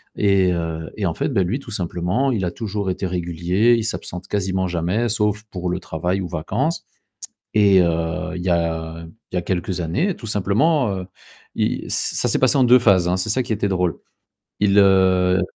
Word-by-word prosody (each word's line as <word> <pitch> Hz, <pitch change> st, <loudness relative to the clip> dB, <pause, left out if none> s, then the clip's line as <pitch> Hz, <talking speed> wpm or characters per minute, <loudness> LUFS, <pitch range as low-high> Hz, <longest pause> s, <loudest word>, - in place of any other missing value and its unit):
et, 100 Hz, -2 st, +3 dB
heu, 80 Hz, -2 st, -4 dB
et 105 Hz, -, -1 dB
en 85 Hz, -, 0 dB
fait, -, -, -2 dB
bah, 105 Hz, -9 st, +1 dB
lui, 105 Hz, +10 st, -2 dB
tout 125 Hz, -, -11 dB
simplement, 90 Hz, +7 st, -1 dB
il 105 Hz, -7 st, -1 dB
a 90 Hz, -, -2 dB
toujours 105 Hz, -1 st, -4 dB
été 95 Hz, +1 st, -2 dB
régulier. 90 Hz, +5 st, +1 dB
Il 115 Hz, -, -1 dB
s'absente 90 Hz, -4 st, -5 dB
quasiment 95 Hz, -2 st, -1 dB
jamais, 90 Hz, +7 st, -1 dB
sauf 105 Hz, -1 st, 0 dB
pour 90 Hz, -1 st, -3 dB
le 90 Hz, +1 st, -2 dB
travail 90 Hz, +3 st, -2 dB
ou 90 Hz, -, -4 dB
vacances 105 Hz, -, -2 dB, 0.7 s
et 100 Hz, -3 st, +5 dB
heu, 85 Hz, +2 st, -1 dB
il 90 Hz, -, -5 dB
y 90 Hz, -, -2 dB
a 85 Hz, -1 st, -2 dB, 0.3 s
il -, -, -10 dB
y -, -, +3 dB
a -, -, -2 dB
quelques 90 Hz, 0 st, -2 dB
années, 135 Hz, -, 0 dB
tout 115 Hz, -, -10 dB
simplement, 115 Hz, -, +2 dB
heu, 90 Hz, -1 st, -6 dB, 0.5 s
il -, -, -1 dB
ça -, -, 0 dB
s'est -, -, +1 dB
passé -, -, +3 dB
en 130 Hz, -, +5 dB
2 125 Hz, +1 st, +6 dB
phases, 95 Hz, -7 st, +4 dB
hein, 90 Hz, -, +1 dB
c'est 95 Hz, +4 st, -2 dB
ça 130 Hz, +5 st, +1 dB
qui 115 Hz, -, -3 dB
était 105 Hz, -1 st, 0 dB
drôle. 90 Hz, -3 st, 0 dB, 0.6 s
Il, 100 Hz, 0 st, +3 dB
heu, 95 Hz, -1 st, +4 dB
95 Hz, 200 wpm, -21 LUFS, 90-105 Hz, 0.7 s, 2